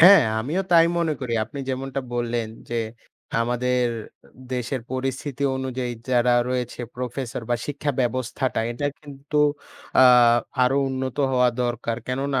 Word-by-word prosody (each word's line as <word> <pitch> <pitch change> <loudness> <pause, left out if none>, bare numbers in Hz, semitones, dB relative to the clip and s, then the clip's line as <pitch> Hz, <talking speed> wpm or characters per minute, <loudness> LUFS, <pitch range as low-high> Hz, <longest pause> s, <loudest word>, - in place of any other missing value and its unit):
হ্যাঁ, 190 +4 +10 0.2
আমিও 160 +11 -1
তাই 165 0 +7
মনে 165 -2 +1
করি। 125 -3 -3
আপনি 140 +6 -9
যেমনটা 135 +1 -2
বললেন, 120 -2 -1 0.2
যে 120 0 -1 0.6
আমাদের 125 +1 +1 0.7
দেশের 125 +1 -2
পরিস্থিতি 135 +1 -3
অনুযায়ী 130 -2 -3 0.2
যারা 120 0 +4 0.2
রয়েছে 125 -1 -2
প্রফেসর 125 -1 -4
বা 120 - +3
শিক্ষা 145 0 -2
ব্যবস্থাটা 130 0 -1
এটা 145 +4 -2
কিন্তু 145 0 -4 0.6
আ - - +9 0.6
আরো 135 +2 +2
উন্নত 130 0 -3 0.2
হওয়া 125 -1 +4
দরকার। 120 -1 -2
কেননা 135 +1 -1
130 Hz, 130 wpm, -24 LUFS, 120-140 Hz, 0.7 s, হ্যাঁ